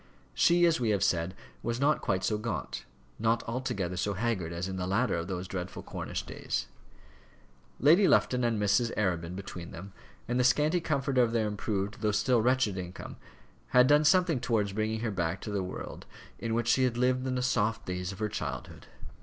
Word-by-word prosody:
She, 175 0 +4
as 165 -4 +3
we 120 -3 0
have 100 -2 +2
said, 85 +2 0 0.3
was 120 +1 -2
not 145 +2 +2
quite 95 0 0
so 105 +1 0
gaunt, 105 -3 -4 0.3
not 115 +1 +1
altogether 105 -7 -2
so 100 +2 -1
haggard 100 -6 -1
as 85 +2 -3
in 95 -1 -4
the 90 0 -2
latter 115 +7 +1
of 85 0 -3
those 90 -1 -4
dreadful 90 -1 -5
Cornish - - -5
days. - - -3 1.1
Lady 170 +8 +6
Lufton 125 -1 +3
and 115 -3 +1
Mrs. 110 +3 +2
Arabin 90 -4 -1
between 90 -3 -7
them, 95 +4 -9 0.3
and 120 +2 0
the - - +4
scanty 150 +7 +3
comfort 140 -4 0
of 120 -2 +3
their 110 -2 +1
improved, 105 0 -3
though 105 - +2
still 120 +3 +2
wretched 120 -5 +2
income, 90 0 -8 0.6
had 125 - +8
done 145 +2 +5
something 165 -2 +4
towards 105 -5 0
bringing 110 +1 -1
her 115 -2 -1
back 85 -1 -1
to 105 - -5
the 100 -1 -1
world 90 0 -7 0.3
in 115 -1 -2
which 120 0 0
she 130 - +4
had 125 -2 +1
lived 130 +1 +1
in 130 - -1
the 125 - -1
soft 115 -2 0
days 90 0 -3
of 100 - -9
her 105 +1 -1
childhood. 105 - -6
110 Hz, 195 wpm, -30 LUFS, 95-125 Hz, 1.1 s, had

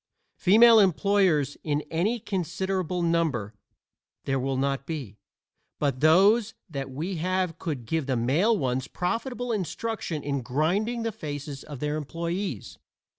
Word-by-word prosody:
(Female 225 +4 +7
employers 190 -6 +3
in 150 -1 -1
any 200 +9 0
considerable 185 -2 -2
number 160 -11 0 0.7
there 135 -1 0
will 135 +1 -1
not 135 0 -1
be, 135 - -6 0.6
but 140 -3 0
those 200 - +4
that 140 -6 -5
we 165 +8 -4
have 180 0 -1
could 145 -9 -4
give 160 +3 -1
the 130 -2 0
male 160 - +2
ones 130 -2 -1
profitable 245 +6 -2
instruction 200 -5 -3
in 140 -1 -1
grinding 185 - 0
the 225 - -1
faces 145 -7 -6
of 145 -4 -9
their 150 0 -1
employees.) 170 - -4
165 Hz, 130 wpm, -26 LUFS, 140-195 Hz, 0.7 s, Female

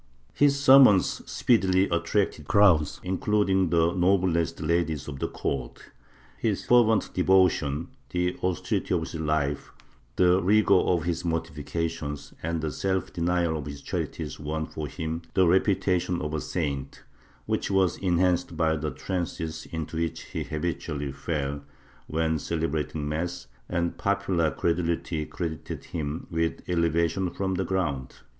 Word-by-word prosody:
His 140 -1 +3
sermons 130 -8 +6
speedily 95 -5 +3
attracted 85 -2 0
crowds, 90 -8 +4
including 95 0 +1
the 85 +1 +3
noblest 90 -2 +2
ladies 80 -2 0
of 70 -2 -6
the - - -1
court; 65 -3 -5 0.5
his - - -1
fervent 115 -3 +4
devotion, 90 -4 +2 0.2
the 90 0 0
austerity 90 -2 -1
of - - 0
his - - -6
life, 75 -3 -1 0.4
the 90 +1 +4
rigor 105 +2 +4
of 90 -3 +3
his 85 0 -2
mortifications 80 -2 -3
and 85 0 -2
the 75 -1 -2
self 95 +2 -2
denial 85 -1 +1
of 75 -2 -5
his 70 -1 -7
charities - - -4
won 80 +1 -3
for 75 -1 -6
him 80 +1 -4
the 95 - +5
reputation 90 -1 +2
of 75 0 -4
a 80 - -1
saint, 70 -5 -3 0.4
which - - -1
was 95 -3 +2
enhanced 90 -2 +1
by 80 -1 +2
the 75 0 -2
trances 80 -3 -4
into 80 -1 -5
which 85 -1 -2
he - - -5
hal^itually 75 -3 -3
fell 70 0 -3 0.5
when 80 0 0
celebrating 80 -1 -2
mass, 80 -1 -3 0.2
and 85 -1 -1
popular 100 -5 +1
credulity 85 0 -1
credited 80 -3 -5
him 75 -1 -3
with 80 0 -2
elevation 85 +1 +1
from 95 +1 -2
the 95 +1 0
ground. 75 -10 -2
85 Hz, 135 wpm, -27 LUFS, 75-90 Hz, 0.5 s, sermons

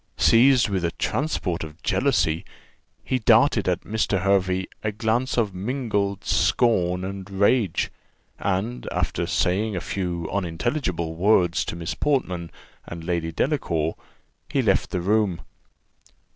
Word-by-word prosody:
Seized 125 +1 +5
with 95 -4 -1
a 85 - +2
transport 105 - -2
of 80 +1 -9
jealousy, 95 - +1 0.6
he 130 - -1
darted 115 -2 +4
at 90 -1 0
Mr. 105 -3 -1
Hervey 95 -1 +2 0.2
a 105 - 0
glance 115 +5 -1
of 110 -5 +1
mingled 100 -2 -2
scorn 90 -6 +2
and 95 0 -6
rage; 100 0 +1 0.5
and, 100 +6 -2
after 85 - -1
saying 90 +4 0
a - - -1
few 85 -1 -3
unintelligible 90 - -2
words 90 -1 +3
to - - -4
Miss 85 -1 -4
Portman 90 - -1 0.4
and 85 -1 -7
Lady 85 -1 -2
Delacour, 80 - 0 0.6
he - - +1
left - - +2
the 90 - -2
room. 100 -2 +1
95 Hz, 130 wpm, -24 LUFS, 85-110 Hz, 0.6 s, Seized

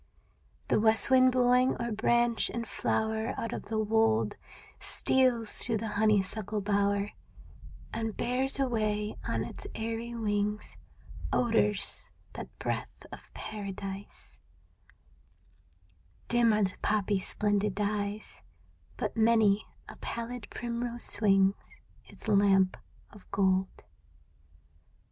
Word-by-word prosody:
The - - +3
west 220 +3 +3
wind 255 0 +6
blowing 250 +1 +3
o'er 235 0 -2
branch 235 +1 +2
and 230 -1 -4
flower 220 +1 -1
Out 230 - -3
of - - -5
the 220 - -2
wold, 220 +1 +2 0.4
Steals 250 -4 +2
through 230 -3 0
the 220 +1 -4
honeysuckle 210 0 +2
bower 200 0 +1 0.8
And 225 -1 -3
bears 260 +3 0
away 215 -5 -1
on - - -1
its - - -6
airy 230 +1 -4
wings 210 -1 -2 0.6
Odors 225 -4 +1 0.2
that - - -7
breath - - -4
of - - -12
paradise; 200 -1 -7 1.9
Dim 235 -1 +5
are 210 -1 +2
the 185 -1 -2
poppies' 205 -2 0
splendid 205 -1 0
dyes, 205 0 -3 0.6
But - - -3
many 220 -2 +3 0.2
a - - -11
pallid 235 -1 -6
primrose 240 0 -4
swings 195 -2 +2 0.3
Its - - -10
lamp 195 -2 +4 0.4
of 205 -2 -16
gold. 190 -1 0
215 Hz, 110 wpm, -30 LUFS, 205-235 Hz, 1.9 s, wind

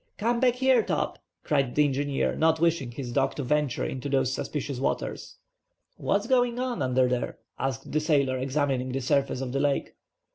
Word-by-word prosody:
"Come 235 +2 +1
back 250 -1 +3
here, 260 0 +4
Top," - - -2 0.2
cried 135 -4 0
the 150 - +5
engineer, 140 0 0
not 160 0 +3
wishing 165 -6 +1
his 120 0 -6
dog 135 +1 +1
to 145 - -3
venture 150 0 0
in 130 - -4
those 135 -1 0
supicious 140 -2 -3
waters. 135 - -3 0.6
"What's 200 +1 0
going 245 -1 +2
on 250 -1 -2
under 130 0 +3
there?" 125 -1 -2 0.2
asked 135 -3 -3
the 155 - +2
sailor 140 -4 +1
examining 130 -1 -1
the 135 - 0
surface 135 0 +1
of 130 -2 -3
the 135 - -1
lake. 140 -1 0
140 Hz, 180 wpm, -27 LUFS, 130-160 Hz, 0.6 s, the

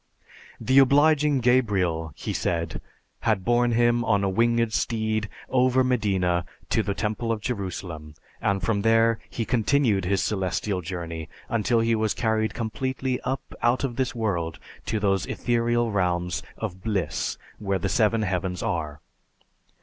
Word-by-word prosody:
The 130 +1 +4
obliging 145 +1 +4
Gabriel, 95 -10 +2
he - - -4
said, 85 -2 -2 0.4
had 110 -5 0
borne 120 0 +3
him 120 0 +3
on 100 -3 +2
a 100 - +2
winged 115 +2 +2
steed 110 -2 -1 0.2
over 130 0 +3
Medina 95 -8 +1 0.3
to - - +3
the 100 -2 -2
Temple 110 +2 -2
of 115 - -1
Jerusalem, 90 -8 -5 0.3
and 100 -1 0
from 100 0 +1
there 115 +1 +3
he 115 - -3
continued 115 -4 +2
his 95 -2 +1
celestial 95 0 -1
journey 85 -2 -5 0.2
until 115 +1 +2
he 115 0 +2
was 110 -1 0
carried 110 -2 0
completely 130 +3 -2 0.4
out 120 +3 +2
of 130 -3 -2
this 130 0 -1
world 85 -8 -1 0.3
to 110 - 0
those 95 -2 +1
ethereal 120 -1 0
realms 90 -3 0 0.2
of 95 -4 -5
bliss 95 -9 -2 0.2
where 100 -2 0
the 90 - -2
Seven 110 -2 +2
Heavens 95 -2 -2
are. 75 -3 -3
110 Hz, 140 wpm, -25 LUFS, 95-120 Hz, 0.4 s, The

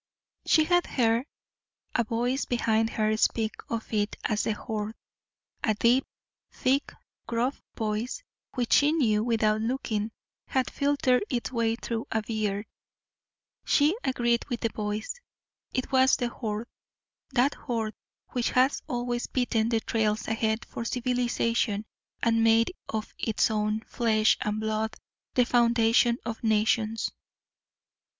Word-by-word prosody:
She 315 - +5
had 350 +2 +2
heard 235 +1 +1 0.7
a 235 - +2
voice 240 +4 -1
behind 225 -2 +1
her 215 -1 +1
speak 220 0 +2 0.2
of 230 0 -4
it 210 0 0
as 210 -1 0
"the 220 - +1
horde" 215 0 -4 0.7
a 215 - +2
deep, 240 +5 +3 0.4
thick, 270 +2 +1 0.4
gruff 235 +4 -1 0.2
voice 220 - -2 0.3
which 245 -3 +1
she 290 +2 +5
knew 220 -9 +2
without 220 -2 +2
looking 225 -3 -1 0.4
had 260 -1 0
filtered 280 -2 +2
its 245 -1 -2
way 230 -2 +1
through 230 -1 -4
a 220 -1 0
beard. 210 -2 -2 1.0
She 300 +5 +3
agreed 240 -2 +1
with 240 - -3
the 230 - +1
voice. 210 - -3 0.6
It 255 - -2
was 260 0 +5
the 245 -1 -1
Horde 220 -1 -4 0.7
that 265 +3 +3
horde 225 -4 -3 0.4
which 245 -2 0
has 255 +3 +3
always 245 -3 -2
beaten 230 -3 +1
the 225 -2 +1
trails 220 -1 0
ahead 220 0 0
for - - -6
civilization 235 -3 0 0.4
and 230 -1 +3
made 225 +6 +4 0.2
of 220 0 -4
its 220 -1 +1
own 215 0 0
flesh 220 -2 +2
and 210 0 -1
blood 220 0 -1 0.4
the 250 - +5
foundation 235 0 +4
of 230 -1 -5
nations. 220 0 +1
230 Hz, 130 wpm, -28 LUFS, 220-245 Hz, 1.0 s, She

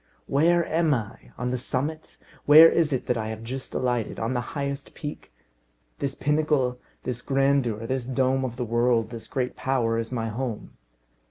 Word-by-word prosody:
"Where 170 +4 +3
am 160 -2 +2
I? 110 -2 -7
on 125 - -2
the 125 0 -1
summit? 145 +5 -3 0.3
Where 155 +3 +10
is 165 -2 +2
it 130 - -1
that 125 - 0
I 110 - -3
have 110 0 -6
just 130 +3 -6
alighted? 125 -3 -1
on 115 +3 -1
the 120 - 0 0.2
highest 140 0 -4
peak? 145 -1 -7 0.7
This 140 -1 -2
pinnacle, 145 -4 +1 0.2
this 125 -1 -3
grandeur, 135 -5 +1
this 130 0 -2
dome 130 0 +1
of 125 -2 -3
the 125 -1 -3
world, 120 0 +1
this 115 -2 -7
great 125 -2 -2
power, 120 -4 0
is 115 +1 -4
my 115 -2 -2
home. 115 -1 -4
130 Hz, 175 wpm, -25 LUFS, 120-140 Hz, 0.7 s, Where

